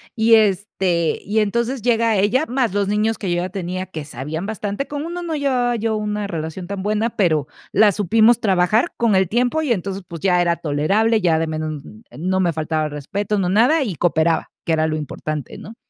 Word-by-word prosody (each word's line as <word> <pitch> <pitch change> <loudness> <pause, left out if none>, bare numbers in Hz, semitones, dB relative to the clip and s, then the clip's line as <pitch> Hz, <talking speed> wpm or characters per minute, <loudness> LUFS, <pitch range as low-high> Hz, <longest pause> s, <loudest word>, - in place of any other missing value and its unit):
Y, 225 -1 +5
este, 190 -5 +1
y 210 +3 0
entonces 235 +4 0
llega 230 -2 +2
ella, 210 +9 +2
más 250 -5 0
los 200 -1 0
niños 210 +2 0
que 195 - -4
yo 175 - +1
ya 180 - -3
tenía, 185 0 -4
que 160 -5 -7
sabían 150 +6 -5
bastante. 210 +4 -4
Con 290 +1 -4
uno 345 +1 -5
no 335 -2 -3
llevaba 255 -4 +1
yo 225 -1 -1
una 210 -1 -2
relación 165 0 -5
tan 200 0 -4
buena, 215 +3 0
pero 155 -7 +2 0.3
la 210 +1 +5
supimos 220 +5 +3
trabajar 195 +2 +2
con 230 -4 +2
el 190 -1 +3
tiempo 245 - +1
y 270 -6 +2
entonces, 195 -1 -4
pues, 165 -2 -8
ya 180 -2 +3
era 170 -1 +2
tolerable, 195 +10 +1
ya 170 -5 +2
de 165 - -1
menos 155 -2 -4 0.3
no 185 +4 0
me 175 -3 +1
faltaba 155 0 -1
respeto, 195 +8 -3
no 185 -3 0
nada, 245 - +4
y 205 -9 -3
cooperaba, 160 0 +1
que - - -2
era 160 0 +2
lo 155 - -1
importante, 150 -2 -5
¿no? 220 - -10
200 Hz, 205 wpm, -20 LUFS, 170-225 Hz, 0.3 s, Y